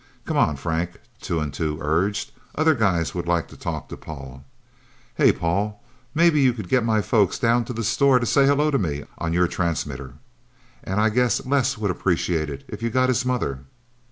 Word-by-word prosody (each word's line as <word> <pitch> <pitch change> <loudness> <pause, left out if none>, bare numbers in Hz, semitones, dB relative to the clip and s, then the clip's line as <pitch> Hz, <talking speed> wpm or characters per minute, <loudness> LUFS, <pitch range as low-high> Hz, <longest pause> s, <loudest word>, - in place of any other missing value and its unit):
"Come - - -2
on, 75 - +3
Frank," 80 +4 -3 0.2
Two 85 - -2
and 75 -3 -3
Two 75 -2 -2
urged. 90 +8 0 0.2
"Other 160 +1 +4
guys 95 - +1
would 85 -1 -4
like 85 -1 +1
to - - -13
talk - - -5
to - - -6
Paul... 70 -3 -9 0.7
Hey, - - +5
Paul 100 +5 -1 0.4
maybe 165 -2 +4
you 130 -2 +4
could 105 -7 -7
get 125 -2 +3
my 110 -2 +2
folks 105 -4 +2
down 120 -1 +2
to 125 - -5
the 115 0 -3
store 130 +5 +4
to 120 - 0
say 135 +3 +4
hello 145 +2 +3
to 140 - +2
me 75 -7 -2 0.2
on 80 -1 -2
your 90 +1 +3
transmitter. 70 -7 -3 0.7
And 95 +2 -2
I 110 +1 +4
guess 125 +2 +1
Les 130 -1 +1
would 105 -3 0
appreciate 85 -3 0
it 70 -1 -7
if 105 - -8
you 115 - 0
got 130 +2 +2
his 125 0 +1
mother..." 70 - -2
100 Hz, 200 wpm, -23 LUFS, 80-125 Hz, 0.7 s, Hey